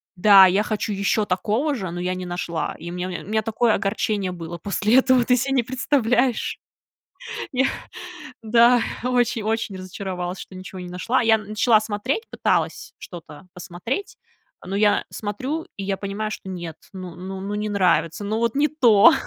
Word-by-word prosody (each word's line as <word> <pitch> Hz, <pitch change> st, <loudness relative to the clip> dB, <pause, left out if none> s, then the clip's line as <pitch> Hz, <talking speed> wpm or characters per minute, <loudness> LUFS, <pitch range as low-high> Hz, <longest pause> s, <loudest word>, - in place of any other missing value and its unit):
Да, 195 Hz, +1 st, +8 dB
я 195 Hz, +3 st, +2 dB
хочу 210 Hz, -1 st, -2 dB
еще 200 Hz, +2 st, +1 dB
такого 215 Hz, +10 st, 0 dB
же, 190 Hz, -7 st, -4 dB
но 175 Hz, -, -5 dB
я 180 Hz, +1 st, -1 dB
не 185 Hz, 0 st, -5 dB
нашла. 175 Hz, -2 st, -3 dB
И 170 Hz, +2 st, -7 dB
у -, -, -7 dB
меня 180 Hz, 0 st, -3 dB
мя 180 Hz, -1 st, -5 dB
у -, -, -14 dB
меня 220 Hz, +1 st, +1 dB
такое 225 Hz, +1 st, +1 dB
огорчение 200 Hz, -1 st, -1 dB
было 170 Hz, -1 st, -7 dB
после 210 Hz, +6 st, +1 dB
этого. 255 Hz, -2 st, +4 dB
Ты 250 Hz, -, +4 dB
се 270 Hz, +3 st, -1 dB
не 260 Hz, -3 st, +2 dB
представляешь. 250 Hz, -1 st, 0 dB, 0.9 s
Я 265 Hz, +1 st, +2 dB, 0.8 s
да, 235 Hz, +2 st, +5 dB, 0.2 s
очень-очень 230 Hz, -4 st, 0 dB
разочаровалась, 185 Hz, -1 st, -5 dB
что -, -, -10 dB
ничего 185 Hz, 0 st, -8 dB
не 180 Hz, -, -7 dB
нашла. 230 Hz, +9 st, 0 dB
Я 225 Hz, -1 st, +4 dB
начала 215 Hz, +1 st, +2 dB
смотреть, 220 Hz, -, -2 dB
пыталась -, -, -1 dB
что-то 165 Hz, -1 st, -11 dB
посмотреть. 190 Hz, -, -5 dB, 0.4 s
А -, -, -14 dB
но 195 Hz, -, -2 dB
я 210 Hz, 0 st, +3 dB
смотрю, 260 Hz, +10 st, -4 dB
и 195 Hz, -, -5 dB
я 195 Hz, 0 st, -1 dB
понимаю, 205 Hz, +2 st, -3 dB
что 195 Hz, -, -7 dB
нет, 175 Hz, -4 st, -6 dB, 0.2 s
ну 185 Hz, -2 st, -7 dB
ну 190 Hz, +2 st, -6 dB
ну 200 Hz, +2 st, -4 dB
не 210 Hz, 0 st, -2 dB
нравится. 180 Hz, -2 st, +1 dB
Ну, 215 Hz, +2 st, -1 dB
вот 230 Hz, -1 st, 0 dB
не 300 Hz, +1 st, +3 dB
то. 240 Hz, -3 st, +6 dB
205 Hz, 175 wpm, -23 LUFS, 185-235 Hz, 0.9 s, Да